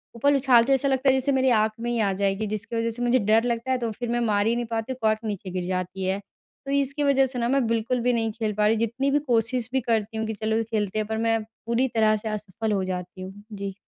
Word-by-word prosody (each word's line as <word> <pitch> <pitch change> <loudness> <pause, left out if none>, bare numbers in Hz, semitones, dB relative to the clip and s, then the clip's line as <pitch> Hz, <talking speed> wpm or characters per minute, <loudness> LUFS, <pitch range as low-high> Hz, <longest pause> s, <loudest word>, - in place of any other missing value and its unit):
ऊपर 285 +5 +3
उछालते 260 -1 +4
ऐसा 270 +1 +2
लगता 265 0 +2
है - - +5
जैसे 265 +2 +1
मेरी 265 -1 +3
आँख 220 -2 +3
में 240 +1 -2
ही 240 - -1
आ 200 -3 +2
जाएगी 200 +2 0
जिसकी 215 +3 -4
वजह 230 0 0
से 235 +2 -6
मुझे 245 +1 +3
डर 220 +1 +3
लगता 240 +1 -1
है 260 - +2
तो 235 -2 -2
फिर 240 +2 -5
मैं 240 0 0
मार 205 -1 +2
ही 230 - +2
नहीं 240 0 -2
पाती 225 +2 -2
हूँ - - -12
कॉर्क 220 -1 +2
नीचे 205 -3 -4
गिर 180 0 -3
जाती 185 +1 -3
है। 190 +1 0 0.5
तो 275 - -4
इसकी 280 +1 0
वजह 275 -1 +4
से 255 -1 -4
न 235 +1 0
मैं 275 -2 +2
बिल्कुल 230 +2 0
भी 245 +1 +2
नहीं 225 -1 0
खेल 215 -1 -3
पा 210 0 +3
रही 220 - +3
जितनी 235 +5 0
भी 290 - +3
कोशिश 235 0 0
भी 265 - +2
करती 225 -2 -1
हूँ 220 - -1
कि 220 - -2
चलो 220 +2 -1
खेलते 215 -2 -2
हैं 215 - -2
पर 220 0 -2
मैं 225 0 +2
पूरी 230 +3 -2
तरह 215 -1 +4
से 215 +1 -4
असफल 215 +1 -3
हो 195 -2 +1
जाती 180 0 -5
हूँ। 185 +1 -7 0.2
जी। 200 -1 -5
225 Hz, 275 wpm, -25 LUFS, 215-250 Hz, 0.5 s, है